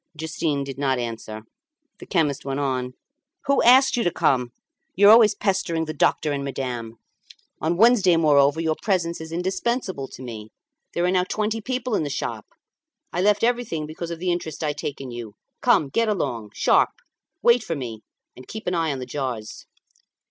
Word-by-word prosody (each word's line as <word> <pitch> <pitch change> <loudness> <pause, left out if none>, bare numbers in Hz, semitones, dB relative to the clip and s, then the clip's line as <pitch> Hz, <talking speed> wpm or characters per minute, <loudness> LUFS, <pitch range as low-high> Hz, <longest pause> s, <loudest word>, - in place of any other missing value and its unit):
Justin 160 -2 -2
did 135 -1 -7
not 135 -2 +1
answer. 115 -2 -5 0.6
The - - -11
chemist 150 -7 0
went 135 0 -3
on 130 -2 -2 0.5
"Who 280 -1 +3
asked 260 +3 +6
you 240 - 0
to - - +2
come? 125 -6 +1 0.5
You 200 +2 +6
are - - +10
always 220 -2 +7
pestering 190 -5 0
the 155 - -5
doctor 155 0 +1
and 140 -1 -2
madame. 125 -4 -4 0.7
On 165 +2 0
Wednesday, 205 -5 +5
moreover, 145 -1 +4
your 160 -1 0
presence 170 -5 0
is 160 0 -8
indispensable 185 - -2
to 130 - -11
me. 110 -3 -8 0.5
There 175 - +1
are 180 - +2
now 180 -1 +2
twenty 215 +3 -2
people 250 +1 -3
in 205 - +2
the 150 - -2
shop. 140 - -4 0.7
I 175 - 0
left 205 +2 +3
everything 235 -10 0
because 160 +2 -6
of 170 - -5
the 180 +2 -1
interest 165 -2 -4
I 150 -1 0
take 145 -1 -5
in 135 -2 -7
you. 115 -3 -8 0.3
Come, 205 - +3
get 230 +9 +1
along! 120 - -2
Sharp! - - +4 0.5
Wait 235 0 +5
for 165 - -3
me, 115 -6 -6 0.3
and 130 - -13
keep 220 0 -8
an 180 - -1
eye 165 -3 +1
on 140 - -3
the 130 - -5
jars." 125 -6 -5
160 Hz, 185 wpm, -23 LUFS, 135-195 Hz, 0.7 s, are